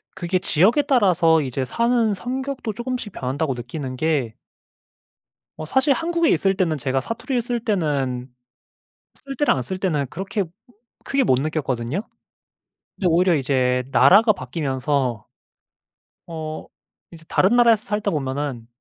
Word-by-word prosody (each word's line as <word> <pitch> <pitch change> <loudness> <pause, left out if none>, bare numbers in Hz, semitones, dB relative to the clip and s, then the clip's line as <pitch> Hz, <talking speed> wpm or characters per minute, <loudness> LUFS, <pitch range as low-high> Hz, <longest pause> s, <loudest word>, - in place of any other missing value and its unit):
그게 185 0 -1
지역에 195 - +3
따라서 180 - +3
이제 135 -1 -3
사는 235 - +1
성격도 255 +1 -4
조금씩 240 -2 -4
변한다고 135 +1 -2
느끼는 130 +2 -6
게 140 -6 0 1.2
어 155 - -6
사실 265 - +3
한국에 335 +3 0
있을 195 -1 +2
때는 165 -5 0
제가 135 0 -1
사투리를 240 - -3
쓸 240 0 -2
때는 140 - -1 0.8
쓸 275 0 -9
때나 290 +3 +3
안 130 - -2
쓸 185 +10 -5
때나 160 -7 0
그렇게 195 - -3 0.6
크게 275 -1 +1
못 130 - +3
느꼈거든요. 140 - -2 0.9
근데 185 - -3
오히려 175 +1 +3
이제 130 -2 +1
나라가 215 - +6
바뀌면서 135 - -2 1.0
어 155 -2 -6 0.5
이제 165 -1 -13
다른 200 +6 +3
나라에서 230 -2 +5
살다 210 -3 -2
보면은 135 -4 -3
170 Hz, 290 characters per minute, -22 LUFS, 135-230 Hz, 1.2 s, 나라가